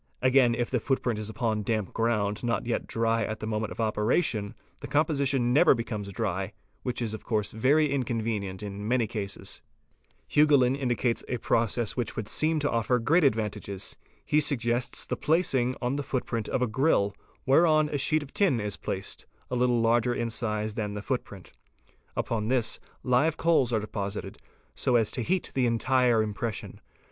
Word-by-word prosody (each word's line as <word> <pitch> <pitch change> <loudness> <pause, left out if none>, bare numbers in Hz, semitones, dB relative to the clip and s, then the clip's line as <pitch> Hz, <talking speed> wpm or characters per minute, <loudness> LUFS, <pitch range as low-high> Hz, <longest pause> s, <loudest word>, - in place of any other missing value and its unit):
Again 130 -2 +4
if 120 0 -2
the 125 - +1
footprint 120 -3 -1
is 110 0 -3
upon 110 -1 -1
damp 105 -1 -2
ground 110 -2 0
not 120 0 -1
yet 120 - -2
dry 115 0 +1
at 110 - -4
the - - -5
moment 110 0 -2
of - - -9
operation, 110 0 0 0.3
the - - -6
composition 140 -5 +1
never 155 +1 +6
becomes 110 -4 -4
dry, 95 -3 -2 0.3
which 125 -1 -3
is 110 -2 -3
of 110 - -7
course 105 -3 -1
very 140 +7 +3
inconvenient 110 -7 -2
in 100 0 -5
many 120 0 +2
cases. 100 -2 -5 0.7
Hugoulin®™ 145 -4 +4
indicates 125 -3 0
a 125 - -2
process 115 -1 0
which 120 -2 -3
would 110 - -4
seem 155 +6 +2
to 145 - 0
offer 115 +2 +1
great 155 +9 +3
ad 135 -6 +4
vantages. 105 -3 -4 0.3
He 150 - +3
suggests 120 -4 -1
the - - -2
placing 135 -6 +1
on 125 +3 0
the 145 - -2
footprint 120 -4 -3
of 125 - 0
a - - +1
grill 110 -5 +2 0.3
whereon 155 +2 +4
a 145 - -2
sheet 155 +3 +3
of 140 - -14
tin 195 - +2
is 105 -1 -2
placed, 95 +1 -5 0.2
a - - 0
little 125 -1 +2
larger 120 +1 +2
in 115 -1 -2
size 110 -2 -2
than 105 -2 -3
the 105 - -5
footprint. - - -4 0.7
Upon 110 -2 -1
this 120 -2 +1 0.2
live 130 +6 +2
coals 160 -7 +3
are 110 - +2
deposited 100 -1 -5 0.3
so 125 - +1
as 115 -3 +3
to 125 - -3
heat 185 +9 -1
the 130 -2 +2
entire 120 -1 +3
impression. 110 +1 -4
120 Hz, 175 wpm, -28 LUFS, 110-130 Hz, 0.7 s, never